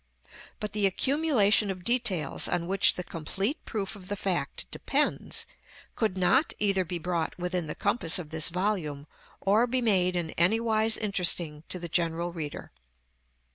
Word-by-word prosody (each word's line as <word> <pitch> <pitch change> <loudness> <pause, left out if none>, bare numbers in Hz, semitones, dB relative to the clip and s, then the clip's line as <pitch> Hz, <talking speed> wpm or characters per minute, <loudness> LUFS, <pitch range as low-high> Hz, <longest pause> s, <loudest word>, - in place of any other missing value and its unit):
But 210 -1 -5
the 210 -2 +3
accumulation 225 - +2
of 185 -2 -5
details 235 -8 +1
on 175 -1 -1
which 195 +2 +3
the 180 - -4
complete 195 - -3
proof 205 -2 -3
of 185 -3 -12
the 205 - -3
fact 190 -3 -2
depends, - - 0 0.5
could 215 -5 -1
not 260 - +3
either 195 -2 +1
be 175 0 -4
brought 170 -1 -2
within 180 -2 -2
the 150 - -5
compass 200 -5 +2
of 160 -4 -7
this 160 0 +2
volume, 170 -6 -2 0.3
or 215 +5 +3
be 255 +2 0
made 185 -6 +2
in 170 -2 -2
anywise 220 +4 +3
interesting 175 -6 +1
to - - -4
the 175 -1 -5
general 170 0 -1
reader. 155 -4 -6
185 Hz, 155 wpm, -28 LUFS, 170-215 Hz, 0.5 s, the